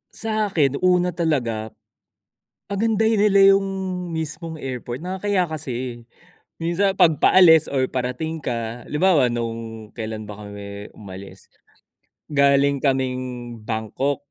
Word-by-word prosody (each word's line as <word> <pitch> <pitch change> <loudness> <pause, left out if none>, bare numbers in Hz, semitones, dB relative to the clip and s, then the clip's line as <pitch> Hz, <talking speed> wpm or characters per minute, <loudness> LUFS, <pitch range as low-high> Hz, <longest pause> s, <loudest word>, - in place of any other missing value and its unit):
Sa'kin 200 -11 0
una 180 -1 +3
talaga, 130 -10 -1 1.0
pagandahin 220 +1 +2
nila 195 -1 +7
yung 195 0 0 0.5
mismong 160 +1 -5
airport. 125 +2 -5
Nakakahiya 190 +1 0
kasi. 145 -5 -4 0.9
Minsan 185 +4 +1
'pag 160 -5 +4
paalis 165 -4 +6
or 130 -2 0
parating 130 +6 -3
ka, 120 -3 -4
halimbawa, 150 -4 +3
nung 115 -2 -5
kailan 110 -1 -5
ba 105 - -8
kami 100 0 -8
umalis? 95 -1 -11 0.8
Galing 140 -1 +3
kaming 130 -2 +1 0.4
Bangkok. 120 +6 -2
140 Hz, 105 wpm, -22 LUFS, 120-180 Hz, 1.0 s, nila